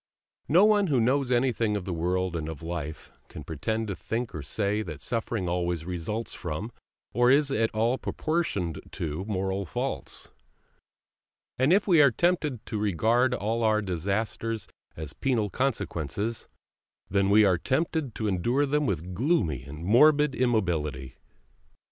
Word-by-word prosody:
No 180 +7 +6
one 210 -2 +4
who 140 -6 +2
knows 130 +3 +2
anything 120 -4 +2
of 95 - -6
the 95 - -3
world 90 +2 -1
and 80 -1 -3
of 80 -1 -8
life 80 -2 -5 0.2
can - - -9
pretend 110 +8 -2
to 100 - -2
think 115 +4 -4
or 80 - -5
say 100 +8 -1
that 75 -9 -6
suffering 115 -3 -2
always 85 -2 -1
results 90 +6 -4
from, 85 +10 -5 0.4
or 120 +2 +4
is 140 +1 +4
at 115 -3 +2
all 115 +4 0
proportioned 130 - -2
to, 80 +2 -3
moral 95 -1 -1
faults; 80 - -4 1.3
and 130 +5 +4
if 200 +3 +4
we 170 -5 +6
are 140 - +7
tempted 150 -3 0
to 110 - -3
regard 115 +6 +2
all 115 +2 -1
our 110 -1 +3
disasters 100 +4 -2 0.3
as 75 -2 -6
penal 110 - 0
consequences, 110 - -2 0.6
then 100 0 +1
we 105 +1 +6
are 90 -3 +3
tempted 145 - -1
to 110 - -2
endure 120 +9 +1
them 150 +1 +1
with 90 -2 -2
gloomy 95 - +1
and 75 +4 -8
morbid 150 +6 +5
immobility. 80 - -1
110 Hz, 150 wpm, -27 LUFS, 90-125 Hz, 1.3 s, are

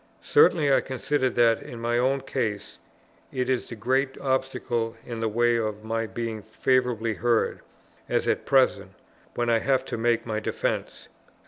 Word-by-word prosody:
Certainly 160 - +4
I - - +4
consider 130 +1 -1
that, 115 -2 +3
in 120 - -9
my 120 +1 -1
own 135 +2 +1
case, 110 -7 -3 0.5
it 130 0 -1
is 130 - -1
the 120 - -6
great 130 +4 0
obstacle 125 -4 -1
in 115 -2 -6
the 110 -1 0
way 120 +2 +2
of 110 -2 -3
my 115 0 -2
being 110 +1 -4
favourably 115 +1 0
heard, 115 +1 +1 0.5
as - - 0
at - - +1
present, 100 -8 +2 0.4
when 120 - -1
I 115 - +4
have 130 +1 +1
to - - -4
make 115 0 +1
my 110 -2 -2
defence. 110 - -3
120 Hz, 160 wpm, -26 LUFS, 115-130 Hz, 0.5 s, Certainly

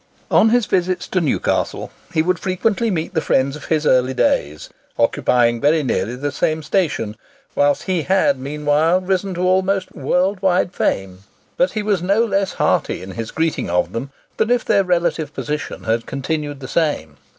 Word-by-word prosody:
On 220 - +5
his 240 0 +3
visit 185 -1 0
to 185 0 -1
Newcastle, 150 - -1 0.2
he 155 - +2
would 180 0 0
frequently 210 +4 0
meet 170 -2 -2
the 160 - +1
friends 135 0 +1
of 150 - -10
his 155 -1 0
early 130 -1 +3
days, 75 - 0 0.3
occupying 120 -1 +2
very 150 +2 +3
nearly 115 -2 -1
the 145 +3 -3
same 155 +2 -1
station, 145 - -1 0.4
whilst 145 0 +2
he 185 -3 0
had 180 -6 +2
meanwhile 150 +5 +1
risen 185 0 -1
to 175 - -3
almost 190 +1 +1
world 185 +6 0
wide 185 -1 +1
fame. 95 - -1 0.4
But 180 - +1
he 215 - -2
was 205 -4 +1
no 200 +6 +2
less 195 -3 0
hearty - - 0
in 95 - -8
his 115 +3 -5
greeting 160 - -1
of 90 +1 0
them 125 +4 -4 0.3
than 220 - +1
if 245 -1 +2
their 195 - +3
relative 170 -4 -1
position 150 0 -4
had 115 +1 -1
continued 145 +1 -3
the 130 - -6
same. 135 - -1
160 Hz, 175 wpm, -19 LUFS, 135-185 Hz, 0.4 s, On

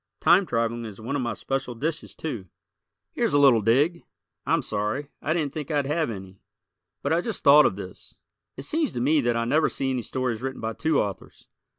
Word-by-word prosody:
Time 180 +2 +5
traveling 115 0 -1
is 110 -3 -8
one 120 +6 -4
of 140 - 0
my 120 - -2
special 135 -2 -3
dishes, 155 +6 -4
too. 120 -12 -5 0.6
Here's - - 0
a - - +5
little 135 -6 +6
dig. 145 - +2 0.5
I'm - - +2
sorry, 105 +7 -2
I 155 - -2
didn't 150 -4 -1
think 150 -3 -5
I'd 145 -3 +1
have 150 +1 0
any, 95 -3 -8 0.6
but 140 - +1
I 170 - +2
just 225 +3 -4
thought 145 +1 +8
of - - -3
this. 95 -2 -10 0.4
It 135 - -6
seems 310 - 0
to - - -3
me 145 +5 +3
that 120 -2 +1
I 115 - 0
never 155 +6 +2
see 135 -1 -1
any 130 -1 -1
stories 125 -2 -2
written 135 0 -4
by 110 0 -3
two 160 +5 +1
authors. 100 -3 -5
135 Hz, 210 wpm, -25 LUFS, 115-150 Hz, 0.6 s, thought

